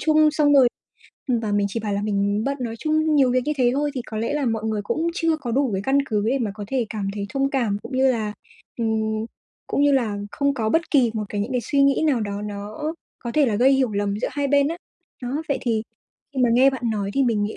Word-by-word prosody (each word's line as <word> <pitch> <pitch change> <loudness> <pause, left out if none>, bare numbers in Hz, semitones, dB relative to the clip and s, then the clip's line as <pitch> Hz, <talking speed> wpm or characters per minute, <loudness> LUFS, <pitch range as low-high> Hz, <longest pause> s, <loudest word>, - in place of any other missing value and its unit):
chung 310 -1 +4
xong 295 -1 +3
rồi 265 -3 +7 0.6
ừm, 240 -3 +2
và 215 -2 -2
mình 205 0 +2
chỉ 230 - -3
bảo 210 -1 -3
là 200 0 -1
mình 205 0 0
bận, 275 0 -1
nói 230 -2 -3
chung 310 +2 +1
nhiều 265 -3 +4
việc 255 +1 +2
như 300 - 0
thế 250 -3 +3
thôi, 290 +1 0
thì 255 - -3
có 220 - -6
lẽ 230 +4 -1
là 285 -3 0
mọi 225 -1 -1
người 215 -2 -1
cũng 320 +10 -1
chưa 330 -2 +1
có 255 -6 -5
đủ 265 +2 +1
cái 190 - -1
căn 275 +1 +3
cứ 210 -4 0
để 270 +3 +1
mà 225 -5 -1
có 210 -1 -6
thể 250 -3 0
cảm 205 -3 -3
thấy 200 -1 -4
thông 275 +2 0
cảm, 235 -7 0
cũng - - -9
như 265 0 +4
là, 215 -3 -2 0.5
ừm, 220 -1 -1 0.4
cũng 280 - 0
như 290 0 +4
là 235 -6 +1
không 280 +3 0
có 225 -5 -1
bất 330 +8 +1
kỳ 255 -6 +4
một 215 -1 -2
cái 205 - -3
những 220 +6 -3
cái 250 - +1
suy 280 +5 +1
nghĩ 275 +1 +3
nào 270 -6 +2
đó 205 -1 -3
nó 205 0 -6 0.5
có 235 -1 -5
thể 295 -3 +4
là 215 - 0
gây 260 +5 +5
hiểu 260 -4 +2
lầm 200 0 -1
giữa - - -1
hai 285 -1 -1
bên 280 0 +3
á. 330 - -3 0.5
Đó, 245 - -3 0.2
vậy 280 - 0
thì 225 -3 0 0.5
khi 265 - -2
mà 245 - +4
nghe 260 +3 +5
bạn 265 -3 -6
nói 200 -2 -2
thì 275 - +3
mình 225 -4 +1
nghĩ 205 +1 -3
240 Hz, 275 wpm, -23 LUFS, 215-275 Hz, 0.6 s, rồi